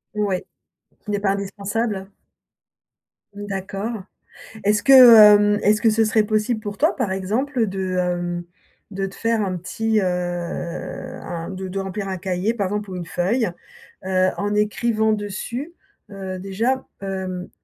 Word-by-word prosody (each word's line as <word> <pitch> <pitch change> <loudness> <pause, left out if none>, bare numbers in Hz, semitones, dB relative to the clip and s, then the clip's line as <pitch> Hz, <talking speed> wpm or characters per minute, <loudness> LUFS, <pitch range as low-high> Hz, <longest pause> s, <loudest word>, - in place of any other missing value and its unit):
Ouais. 205 -3 -1 0.5
Qui 210 - -7
n'est 205 - 0
pas 200 -1 +1
indispensable? 200 +1 -3 1.2
D'accord. 200 +1 -5 0.6
Est-ce 210 +1 +2
que, 275 - +6
hem, 210 -5 +9
est-ce 210 +1 +3
que 230 - +5
ce 220 +1 +3
serait 215 0 +3
possible 215 +2 0
pour 205 -2 -6
toi, 315 +5 +2
par 240 -8 -1
exemple, 225 +7 -1
de, 190 -1 -3
hem, 175 -1 -1 0.5
de 195 0 -2
te 195 - -11
faire 230 -1 0
un 185 -2 -2
petit, 220 +5 -1
heu, - - 0
un 175 -1 -4
de 190 0 -5
de 190 +1 -4
remplir 195 +1 -4
un 190 -1 -3
cahier, 185 +4 -1
par 205 -5 -1
exemple, 205 0 -4
ou - - -5
une 175 -1 -5
feuille, 210 +7 0 0.6
heu, 185 0 +2
en 205 +1 -1
écrivant 220 +1 +1
dessus, 215 - -4 0.4
heu, 190 -1 -6
déjà, 225 +8 -1 0.2
hem, 190 -2 -4
200 Hz, 150 wpm, -22 LUFS, 190-220 Hz, 1.2 s, hem